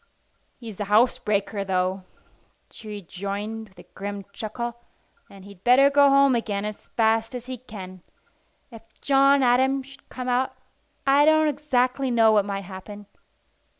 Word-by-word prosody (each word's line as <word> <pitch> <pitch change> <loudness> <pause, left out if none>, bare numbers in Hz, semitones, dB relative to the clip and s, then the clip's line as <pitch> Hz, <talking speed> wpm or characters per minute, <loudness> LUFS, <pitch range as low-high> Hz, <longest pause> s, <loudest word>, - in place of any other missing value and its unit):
"He's 225 -5 -10
a 205 - -2
housebreaker, 210 -2 +1
though," 185 0 -1 0.7
she 220 - -12
rejoined 205 +2 -6
with 190 - -28
a - - -17
grim 200 0 -6
chuckle; 235 +3 -6 0.5
"and 195 -1 -14
he'd 200 -2 -15
better 270 +3 +5
go 285 0 +5
home 275 -1 +5
again 210 -4 -2
as 210 0 -7
fast 225 +1 +1
as 245 -1 -7
he 255 -1 -7
can. 185 -6 -10 0.7
If 225 -2 -11 0.2
John 275 0 +4
Adam 260 +2 +2
should 275 +1 -17
come 255 0 -6
out, 250 +1 0 0.5
I 280 +1 +5
don't 315 0 +4
exactly 265 -2 0
know 225 -2 +4
what 210 -2 +3
might 200 -1 -4
happen. 200 +2 -10
225 Hz, 150 wpm, -24 LUFS, 200-260 Hz, 0.7 s, better